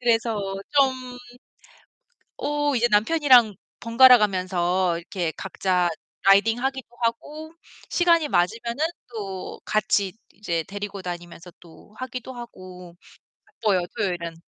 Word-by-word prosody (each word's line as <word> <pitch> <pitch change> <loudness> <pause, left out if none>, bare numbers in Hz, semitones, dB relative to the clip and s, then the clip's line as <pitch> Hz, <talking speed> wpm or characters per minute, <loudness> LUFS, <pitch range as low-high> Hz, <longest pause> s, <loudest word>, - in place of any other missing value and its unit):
그래서 230 -2 +1 0.3
좀 260 -3 +1 1.2
어 290 -1 0
이제 240 -1 +2
남편이랑 240 0 +5 0.3
번갈아가면서 190 -7 +4
이렇게 170 -1 -4
각자 185 -2 0 0.4
라이딩 200 +4 +5
하기도 265 -1 -3
하고 300 +7 -3 0.4
시간이 335 -3 +3
맞으면은 235 - 0 0.2
또 195 -5 -7
같이 205 -2 +1 0.2
이제 170 -5 -3
데리고 200 0 -7
다니면서 175 0 -8
또 170 +5 -18
하기도 255 0 -6
하고. 185 -7 -11 0.7
바빠요, 200 -5 +2
토요일은. 175 -6 -2
215 Hz, 255 characters per minute, -24 LUFS, 185-250 Hz, 1.2 s, 남편이랑